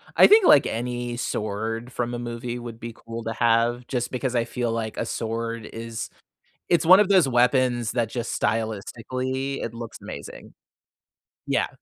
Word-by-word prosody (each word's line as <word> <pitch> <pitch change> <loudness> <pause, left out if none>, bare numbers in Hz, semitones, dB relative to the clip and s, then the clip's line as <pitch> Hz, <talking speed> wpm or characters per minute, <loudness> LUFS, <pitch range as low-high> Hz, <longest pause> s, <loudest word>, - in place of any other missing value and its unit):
I - - +8
think, 425 -2 +7
like, 145 - +7
any 120 +1 -3
sword 110 +2 -3
from 120 -1 -3
a 120 - -3
movie 120 0 -5
would 120 -1 -8
be 115 0 -7
cool 115 +1 -8
to 115 - -3
have, 120 +1 +2
just 120 -2 -2
because 125 0 -2
I 115 -1 +2
feel 120 -1 -2
like 115 -1 -3
a - - -1
sword 115 0 -3
is 115 0 -6 0.6
it's 170 -2 +3
one 185 +3 +9
of 210 -2 +4
those 185 -8 +5
weapons 125 -1 +2
that 115 -2 0
just 120 -1 -3
stylistically, 130 +5 -2
it 115 - -4
looks 115 -1 -8
amazing. - - -9 1.0
Yeah. - - +1
120 Hz, 170 wpm, -24 LUFS, 115-125 Hz, 1.0 s, one